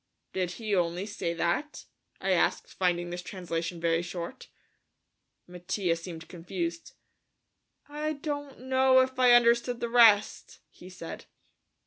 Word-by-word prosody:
"Did 180 -1 -2
he 215 -2 -2
only 175 +1 0
say 175 -5 -3
that?" 175 - -2 0.3
I - - -1
asked, - - +1
finding 175 -1 0
this 175 0 -4
translation 170 -2 -4
very 165 0 +1
short. 175 +7 -7 1.0
Mattia 180 0 -2
seemed 165 -1 -9
confused. 170 -1 -5 0.9
"I 300 +1 -3
don't 285 -2 -5
know 260 0 +4
if 260 0 -2
I 250 -1 +6
understood 240 0 +4
the 235 - -2
rest," 225 -3 +4
he 180 - -13
said. 180 -3 -9
185 Hz, 125 wpm, -28 LUFS, 170-245 Hz, 1.0 s, I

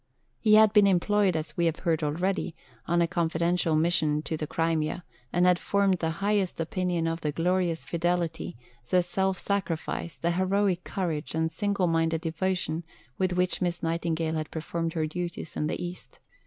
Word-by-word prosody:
He 215 -1 +5
had 215 -1 +6
been 205 -2 +6
employed, 195 0 +3
as 160 0 -3
we 170 -1 +2
have 165 - -2
heard 165 -3 +1
already, 170 +3 -1 0.3
on 170 +1 +3
a - - +1
confidential 170 0 +1
mission 155 -2 +2
to 160 - -2
the 155 -1 -4
Crimea, 165 +2 -1 0.3
and 175 +1 +3
had 180 -1 +4
formed 200 -2 +2
the 160 - 0 0.2
highest 205 -4 +1
opinion 175 -1 -1
of 165 0 -2
"the 150 - -1
glorious 175 +1 0
fidelity, 170 -4 -1 0.3
the 180 -1 +4
self 190 +2 0
sacrifice, 170 -4 -2
the 170 - 0
heroic 185 0 +1
courage, 165 -6 -3
and 160 0 0
single 200 +1 0
minded 165 -1 +1
devotion" 170 0 -1 0.4
with 185 -1 +1
which 180 0 0
Miss 175 -2 -1
Nightingale 165 -1 -1
had 155 0 -3
performed 165 +1 -3
her 160 -2 0
duties 170 0 -5
in 150 - 0
the - - -3
East. 175 +1 -7
170 Hz, 170 wpm, -28 LUFS, 160-185 Hz, 0.4 s, had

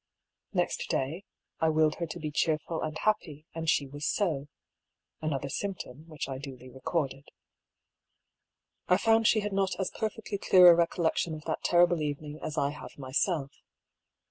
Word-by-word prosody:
Next - - -1
day, 160 +9 -1 0.3
I 160 - +3
willed 155 -1 +3
her 170 - -1
to - - -7
be 155 -1 -4
cheerful 160 +2 0
and 155 0 -3
happy, 160 -8 -1
and 165 -1 -2
she 140 - +3
was 145 +2 -9
so. 155 -9 0 0.7
(Another 140 -3 -2
symptom, 155 -2 -5
which 155 -4 -5
I 135 -1 -5
duly 130 -2 -9
re 130 +1 -13
corded.) 140 -4 -2 1.6
I 180 - +5
found 225 +1 +4
she 215 - +4
had 205 -1 -3
not 195 -1 0
as 190 - -1
perfectly 220 -2 -3
clear 180 -2 +8
a - - +6
recollection 170 -1 +1
of 155 - -10
that 160 - -3
terrible 175 -1 +4
evening 150 +1 -4
as 155 0 -5
I 140 -1 +1
have 150 - -10
myself. 140 +2 0
155 Hz, 165 wpm, -29 LUFS, 145-175 Hz, 1.6 s, clear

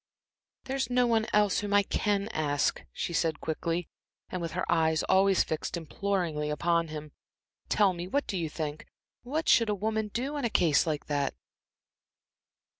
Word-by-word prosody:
"There's 265 -2 -2
no 250 0 +3
one 225 -2 +2
else 210 -2 +3
whom 205 -1 -1
I 205 - +6
can 200 0 0
ask," 145 -2 0
she 170 - -4
said 165 -2 0
quickly, 165 +2 -2 0.4
and 185 - -3
with 165 -2 -4
her 180 - -1
eyes 160 -1 +2
always 190 0 +4
fixed 160 +2 -3
imploringly 170 -3 -2
upon 170 +2 +1
him. 155 -1 -7 0.6
"Tell 200 -3 +4
me 175 0 -5
what 280 +2 -1
you 170 -4 -1
think. 150 -1 -5 0.3
What 300 +6 -3
should 230 -2 +5
a 210 - +1
woman 220 +2 -1
do 260 +8 -3
in 285 - -3
a 235 - +1
case 165 -7 +3
like 150 -2 -2
that?" 145 -2 -1
180 Hz, 165 wpm, -29 LUFS, 160-210 Hz, 0.6 s, I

